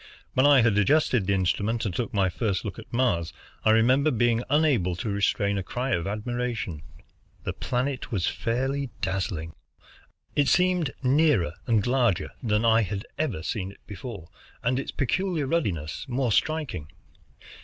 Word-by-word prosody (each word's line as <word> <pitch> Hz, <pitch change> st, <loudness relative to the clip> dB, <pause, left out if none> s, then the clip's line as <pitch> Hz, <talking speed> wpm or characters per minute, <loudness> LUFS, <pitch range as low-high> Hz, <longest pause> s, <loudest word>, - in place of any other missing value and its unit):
When 130 Hz, +2 st, +4 dB
I 140 Hz, -3 st, +7 dB
had 110 Hz, -3 st, +3 dB
adjusted 125 Hz, -3 st, +3 dB
the 100 Hz, -, +3 dB
instrument 105 Hz, +5 st, 0 dB
and 100 Hz, -, -2 dB
took 120 Hz, +7 st, -2 dB
my 100 Hz, -4 st, +2 dB
first 100 Hz, +1 st, -1 dB
look 100 Hz, -4 st, -5 dB
at -, -, -13 dB
Mars, 85 Hz, -10 st, +1 dB, 0.3 s
I -, -, +3 dB
remember 125 Hz, +7 st, +4 dB
being 120 Hz, -2 st, +2 dB
unable 135 Hz, -, +2 dB
to 100 Hz, +5 st, -4 dB
restrain 100 Hz, 0 st, +1 dB
a -, -, -3 dB
cry 125 Hz, +7 st, -3 dB
of 85 Hz, -3 st, 0 dB
admiration. 110 Hz, -5 st, -3 dB, 0.6 s
The -, -, -3 dB
planet 130 Hz, +2 st, -2 dB
was 95 Hz, -6 st, 0 dB
fairly 135 Hz, +5 st, -1 dB
dazzling. 90 Hz, -4 st, -2 dB, 0.8 s
It 145 Hz, -1 st, +3 dB
seemed 180 Hz, -4 st, +3 dB
nearer 130 Hz, -, +3 dB
and 110 Hz, -4 st, +2 dB
larger 120 Hz, -7 st, +1 dB
than 110 Hz, -2 st, +1 dB
I 115 Hz, 0 st, +5 dB
had 100 Hz, +1 st, -3 dB
ever 130 Hz, -, -1 dB
seen 95 Hz, 0 st, -3 dB
it -, -, -20 dB
before, 105 Hz, -, -8 dB, 0.3 s
and 125 Hz, +2 st, +1 dB
its -, -, -5 dB
peculiar 170 Hz, +3 st, 0 dB
ruddiness 100 Hz, -, -2 dB
more 125 Hz, -1 st, 0 dB
striking. 150 Hz, -, 0 dB
115 Hz, 155 wpm, -26 LUFS, 100-135 Hz, 0.8 s, I